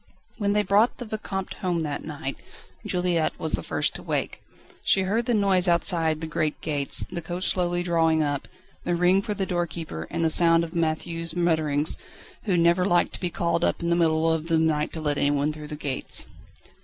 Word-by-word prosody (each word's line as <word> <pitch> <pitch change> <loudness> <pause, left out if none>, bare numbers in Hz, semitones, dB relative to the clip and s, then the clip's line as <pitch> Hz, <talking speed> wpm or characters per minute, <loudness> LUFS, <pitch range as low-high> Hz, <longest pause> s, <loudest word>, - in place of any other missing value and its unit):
When 200 -1 +1
they 210 0 +2
brought 205 +4 +3
the 245 - -6
Vicomte 205 -3 -4
home 175 -3 0
that 145 -2 -4
night, 145 -3 -5 0.5
Juliette 180 -3 0
was 160 - -2
the 90 - -1
first - - -1
to - - -8
wake. - - -3 0.4
She 190 - +3
heard 220 +5 0
the 240 - +2
noise 195 -3 +2
outside 165 -2 +2
the - - -3
great 155 -1 -2
gates, 145 -3 +1
the 170 - -4
coach 175 +3 -1
slowly 175 -1 0
drawing 165 -2 +2
up, 145 -2 -2 0.4
the 175 - 0
ring 180 +3 +3
for 210 +1 -3
the 195 -1 -1
doorkeeper, 170 - -3
and 165 0 -2
the 160 - +2
sound 165 0 +5
of 165 0 -6
Matthieu's 165 0 -1
mutterings, 160 -4 +1 0.5
who 190 -5 +1
never 170 +2 +4
liked 175 -2 +2
to - - -6
be 180 - -1
called 170 0 -1
up - - +1
in 170 - 0
the 170 - +3
middle 165 -1 +2
of 160 0 -3
the 165 -1 +2
night 155 -2 +1
to 160 - -5
let 145 -2 0
anyone 145 +1 +1
through 150 0 -8
the 150 - -6
gates. 140 -3 -1
170 Hz, 205 wpm, -25 LUFS, 155-180 Hz, 0.5 s, sound